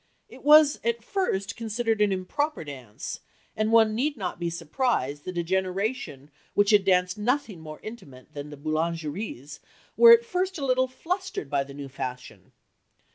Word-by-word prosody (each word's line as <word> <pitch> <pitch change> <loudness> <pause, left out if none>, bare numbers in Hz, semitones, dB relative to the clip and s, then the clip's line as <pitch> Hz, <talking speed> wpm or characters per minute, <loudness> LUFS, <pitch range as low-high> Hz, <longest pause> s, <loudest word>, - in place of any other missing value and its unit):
It - - -14
was 300 0 +7
at 235 0 -1
first 205 - -2
considered 225 -1 -1
an 205 -1 +4
"improper" 195 - -2
dance, 130 -8 -7 0.4
and 215 0 0
one 220 -1 +5
need 280 +5 -1
not 185 -4 -4
be 170 -1 -1
surprised 165 - -1
that 185 -1 -5
a 170 - 0
generation 190 - -2 0.2
which 205 +1 +4
had 205 -2 +5
danced 180 +1 +2
nothing 240 - -1
more 155 -1 -9
intimate 150 - -11
than 145 0 -7
the 145 - -10
"boulangeries" 155 - -3 0.4
was 465 0 +9
at 470 - -15
first 375 -4 -1
a 280 - -3
little 260 0 +2
flustered 360 - -4
by 140 -1 +1
the 140 0 -12
new 140 -1 -7
fashion. 125 -1 -7
195 Hz, 165 wpm, -26 LUFS, 155-255 Hz, 0.4 s, was